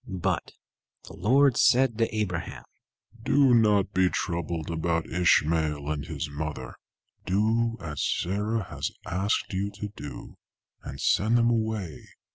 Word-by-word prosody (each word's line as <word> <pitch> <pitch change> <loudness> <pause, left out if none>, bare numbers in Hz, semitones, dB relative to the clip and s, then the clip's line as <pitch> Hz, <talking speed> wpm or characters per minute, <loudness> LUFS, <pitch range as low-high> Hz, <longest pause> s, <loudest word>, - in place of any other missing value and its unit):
But 95 -4 -2 0.5
the - - -12
Lord 130 +6 +3
said 125 -2 +4
to 115 -1 0
Abraham, 90 -5 -3 0.6
"Do 135 +2 +4
not 105 -4 +3
be 95 0 +3
troubled 85 -2 -3
about 80 0 -1
Ishmael 80 -4 +1
and 75 -2 -3
his - - -4
mother. 75 -3 -5 0.5
Do 115 +4 +1
as 75 -4 -5
Sarah 105 +4 -1
has - - -4 0.2
asked 95 +4 -1
you 95 +2 -1
to 105 - -5
do, 75 - -10 0.4
and 70 - -8
send 110 - +2
them 120 0 +3
away. 110 -8 -2
95 Hz, 130 wpm, -27 LUFS, 80-110 Hz, 0.6 s, said